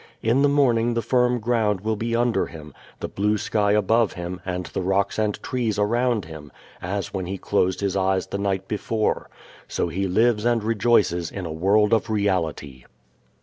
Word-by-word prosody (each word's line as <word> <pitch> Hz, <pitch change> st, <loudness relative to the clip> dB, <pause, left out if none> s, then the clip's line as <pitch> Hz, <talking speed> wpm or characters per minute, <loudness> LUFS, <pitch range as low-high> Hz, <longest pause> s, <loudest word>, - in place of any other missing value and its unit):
In 115 Hz, +5 st, +3 dB
the 145 Hz, -, +4 dB
morning 120 Hz, -5 st, +2 dB
the 115 Hz, -, -1 dB
firm 125 Hz, +1 st, +2 dB
ground 110 Hz, -4 st, 0 dB
will 110 Hz, +1 st, -1 dB
be 115 Hz, +2 st, -2 dB
under 120 Hz, 0 st, +1 dB
him, 75 Hz, -3 st, -11 dB, 0.3 s
the -, -, -2 dB
blue 105 Hz, +2 st, 0 dB
sky 105 Hz, 0 st, +1 dB
above 110 Hz, +1 st, +2 dB
him 90 Hz, +1 st, -6 dB
and 90 Hz, -1 st, -3 dB
the -, -, -4 dB
rocks 100 Hz, +3 st, 0 dB
and 105 Hz, -1 st, 0 dB
trees 120 Hz, -5 st, -1 dB
around 115 Hz, 0 st, +1 dB
him 80 Hz, -3 st, -10 dB, 0.3 s
as 95 Hz, +2 st, -4 dB
when 95 Hz, -3 st, -3 dB
he 95 Hz, +2 st, -4 dB
closed 95 Hz, -1 st, 0 dB
his 100 Hz, -1 st, -1 dB
eyes 95 Hz, -1 st, +1 dB
the 100 Hz, -, -5 dB
night 95 Hz, -1 st, -1 dB
before. 110 Hz, +1 st, -1 dB, 0.4 s
So -, -, -2 dB
he 95 Hz, +3 st, -2 dB
lives 110 Hz, +3 st, +2 dB
and 120 Hz, -2 st, +1 dB
rejoices 105 Hz, -6 st, +2 dB
in 95 Hz, -3 st, -6 dB
a 80 Hz, -, -4 dB
world 105 Hz, +6 st, +3 dB
of 115 Hz, 0 st, +1 dB
reality. 85 Hz, -, -1 dB
105 Hz, 185 wpm, -23 LUFS, 95-115 Hz, 0.4 s, the